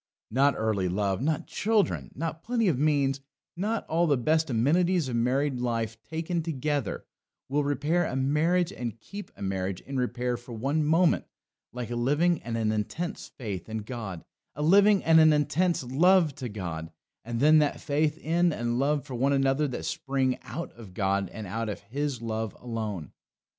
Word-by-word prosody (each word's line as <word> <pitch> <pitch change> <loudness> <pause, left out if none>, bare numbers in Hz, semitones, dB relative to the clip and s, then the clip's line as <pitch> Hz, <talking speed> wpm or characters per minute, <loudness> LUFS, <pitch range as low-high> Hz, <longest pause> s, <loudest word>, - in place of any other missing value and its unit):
Not 135 +4 +3
early 105 -5 0
love, 100 +2 0
not 155 +2 0
children, 215 -1 0
not 160 0 -4
plenty 230 0 0
of 150 -8 +2
means, 140 -2 +2 0.4
not 210 +5 -1
all 170 +2 +1
the 145 -3 +3
best 155 +5 +1
amenities 165 +7 +2
of 125 - -2
married 130 +3 +1
life 115 -2 -2
taken 165 +5 -3
together, 145 -5 -2 0.4
will 145 +2 +1
repair 150 +4 +1
a - - -4
marriage 160 +6 +2
and 115 -2 -5
keep 200 - -8
a - - -7
marriage 95 -1 -2
in 135 0 -5
repair 125 -1 -1
for 120 0 -11
one 140 +7 0
moment 165 +3 +3 0.5
like 120 -1 -5
a - - -2
living 145 +8 +2
and 115 0 -3
an 110 -1 +1
intense 110 - -3
faith 105 -7 -6
in 110 -1 -4
God; 110 -7 -6 0.3
a 150 - -3
living 200 +4 +5
and 160 0 +6
an 155 0 +7
intense 150 +3 +1
love 160 +5 +4
to 125 -2 -6
God; 85 -6 -5 0.3
and 115 +1 -3
then 155 +3 +6
that 150 -2 +1
faith 150 +2 0
in 170 +2 +2
and 120 -3 -1
love 145 0 +1
for 130 - -8
one 135 +3 +2
another 135 +2 +2
that 130 - -5
spring 135 -2 -1
out 170 - -6
of 105 -6 -13
God 95 -1 0
and 110 -2 -7
out 110 +3 -3
of 105 - -4
His 130 +3 -3
love 110 -1 -3
alone. 110 -9 -4
135 Hz, 180 wpm, -28 LUFS, 115-160 Hz, 0.5 s, an